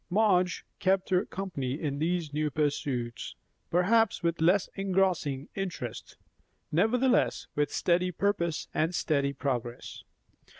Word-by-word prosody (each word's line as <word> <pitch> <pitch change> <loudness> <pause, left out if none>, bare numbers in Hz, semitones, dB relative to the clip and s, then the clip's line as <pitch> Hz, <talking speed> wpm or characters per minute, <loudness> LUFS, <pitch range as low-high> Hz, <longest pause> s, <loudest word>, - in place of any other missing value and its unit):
Madge 185 -3 +2
kept 190 -1 +1
her 185 +2 +2
company 145 -8 -4
in 140 -2 -2
these 165 -1 -1
new 150 0 0
pursuits, 135 -5 -2 0.3
perhaps 205 +5 +3
with 170 -1 0
less 180 +4 +4
engrossing 185 -8 0
interest; 195 -2 -5 0.5
nevertheless 240 +9 +2
with 145 0 0
steady 180 +1 +1
purpose 170 -3 -1
and 165 +3 0
steady 140 -4 +1
progress. 125 -3 -4
170 Hz, 115 wpm, -29 LUFS, 145-190 Hz, 0.5 s, less